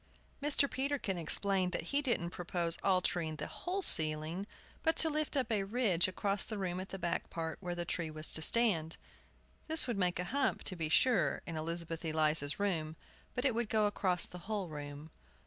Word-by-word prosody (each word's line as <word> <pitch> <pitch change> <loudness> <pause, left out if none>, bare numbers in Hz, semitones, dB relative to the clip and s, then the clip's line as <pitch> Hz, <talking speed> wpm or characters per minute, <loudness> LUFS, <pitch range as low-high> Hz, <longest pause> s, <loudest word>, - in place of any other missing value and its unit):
Mr. 285 -1 +2
Peterkin 265 -9 -2
explained 185 +3 +1
that - - -2
he 285 - +3
didn't 235 -11 -1
propose 175 -1 -1
altering 180 -4 +1
the 150 - -5
whole 375 +2 -3
ceiling, 155 - +4 0.3
but 320 - +2
to 320 - +5
life 305 0 0
up 255 -4 0
a 210 -3 +1
ridge 195 -5 +2
across 195 +2 -1
the 220 - -5
room 185 -2 -3
at 190 - -7
the 195 - -6
back 175 -2 -2
part 160 -1 -5
where 175 -2 -4
the 175 0 -3
tree 170 -2 -3
was 155 0 -5
to 160 - 0
stand. 170 -6 +3 0.7
This 320 0 +6
would 235 -5 -2
make 180 -1 +1
a 180 - -1
hump, 275 -2 0
to 185 - -2
be 160 -3 -3
sure, 250 +9 +3
in 165 - -5
Elizabeth 165 +1 -4
Eliza's 155 -2 0
room; 165 -6 -1 0.4
but 250 - -2
it 260 - +3
would 230 -1 -2
go 215 -1 +2
across 190 -3 +2
the 180 - -9
whole 205 -5 -2
room. 145 +1 -8
180 Hz, 195 wpm, -33 LUFS, 160-225 Hz, 0.7 s, This